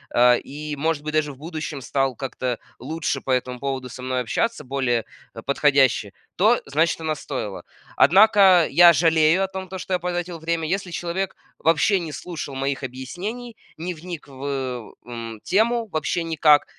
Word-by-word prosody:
э, 125 0 +6
и 150 +1 -6
может 155 0 -1
быть 155 0 -4
даже 155 -1 +1
в 135 - -13
будущем 155 -1 -5
стал 135 +1 0
как-то 130 -1 -3 0.2
лучше 150 +1 -3
по - - -10
этому 125 -1 0
поводу 135 -1 -3
со 125 +1 -9
мной 130 0 -1
общаться, 190 - -1
более, 125 -4 0 0.3
э, 115 - -7
подходяще, 135 -6 +3 0.3
то 220 +6 +4
значит 160 +4 +1
она 160 -1 0
стоила. 130 -9 -5 0.3
Однако, 195 -3 +6
я 175 0 +7
жалею 160 +3 +4
о - - 0
том, 190 -1 -7
то 190 - -5
что 185 - -4
я 180 - +2
потратил 175 -1 -3
время. 165 0 -1
Если 190 +2 -2
человек 175 +2 -3 0.2
вообще 165 +5 +3
не 165 -3 -5
слушал 155 -3 -6
моих 135 +1 -2
объяснений, 180 - -6 0.2
не 175 +3 -4
вник 170 -1 -8
в, 135 -1 -11
э, 130 -5 -4
м, 115 -2 -7
тему 225 +4 +2
вообще 160 -1 -1
никак. 155 -2 +4
155 Hz, 170 wpm, -23 LUFS, 135-175 Hz, 0.3 s, я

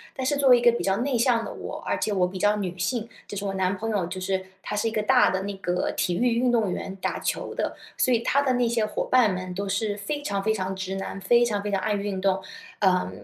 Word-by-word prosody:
但 260 - -3
是 285 +2 +1
作 280 -1 +2
为 250 -1 +8
一 - - -1
个 240 0 +6
比 235 - -2
较 195 0 +2
内 250 +2 0
向 235 -1 +3
的 - - -6
我， - - -7
而 - - -1
且 210 - 0
我 185 -2 +3
比 185 +1 -7
较 205 +2 +3
女 185 -3 -4
性， 225 +5 -2 0.2
就 205 - -7
是 200 - -4
我 195 -1 -2
男 190 0 +1
朋 225 +3 -4
友， 200 -5 0
就 185 +2 -6
是 190 0 -1 0.2
他 - - -5
是 210 +2 0
一 - - -1
个 215 -1 -1
大 255 +2 +5
的 190 - -1
那 200 +1 -4
个 180 -1 -1
体 175 - +1
育 235 +4 +2
运 250 +1 +2
动 225 -6 +2
员， 190 +1 -4
打 - - -1
球 - - -3
的， - - -2 0.2
所 255 - +3
以 235 - +3
他 275 +4 +2
的 265 -2 +1
那 245 -1 +2
些 230 -2 +1
伙 210 - -2
伴 245 -6 +4
们 185 0 -5
都 200 +2 -3
是 205 +1 -1
非 290 +9 -3
常 200 -8 -2
非 220 +2 +1
常 190 -2 -2
直 190 0 -4
男， 195 0 -5
非 235 +5 +4
常 210 -4 0
非 205 - -3
常 200 - +1
爱 215 - 0
运 200 -2 -2
动。 190 0 +1 0.4
呃 185 - +2
205 Hz, 310 characters per minute, -25 LUFS, 190-235 Hz, 0.4 s, 为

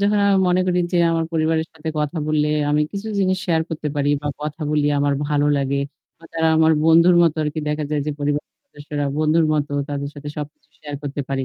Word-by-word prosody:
যখন 205 +1 +2
আমি 200 - +4
মনে 180 +1 +3
করি 180 -1 +1
যে 175 - +3
আমার 165 0 0
পরিবারের 160 0 +1
সাথে 160 0 -7
কথা 150 +2 -2
বললে, 150 -1 +2 0.2
আমি 150 - +2
কিছু 200 +2 -5
জিনিস 185 -1 +1
শেয়ার 165 -2 +2
করতে 155 -2 -4
পারি। 145 0 +1
বা 145 - -2
কথা 150 +1 -5
বলি 150 -1 +1
আমার 145 0 +1
ভালো 145 0 +2
লাগে। 140 0 0 0.4
আ - - -14
তারা 160 0 +1
আমার 160 0 +5
বন্ধুর 170 +2 +6
মতো 165 -2 +2
আরকি 150 +1 -3
দেখা 150 0 -1
যায় 150 -1 0
যে 150 - -1
পরিবারের 145 0 -2
সদস্যরা 145 - -5
বন্ধুর 155 +1 +3
মতো 145 -1 -1 0.2
তাদের 140 0 -3
সাথে 145 0 -8
সবকিছু 150 -1 -8
শেয়ার 145 -1 -8
করতে 145 0 -4
পারি। 135 -1 -1
150 Hz, 215 wpm, -21 LUFS, 145-165 Hz, 0.4 s, বন্ধুর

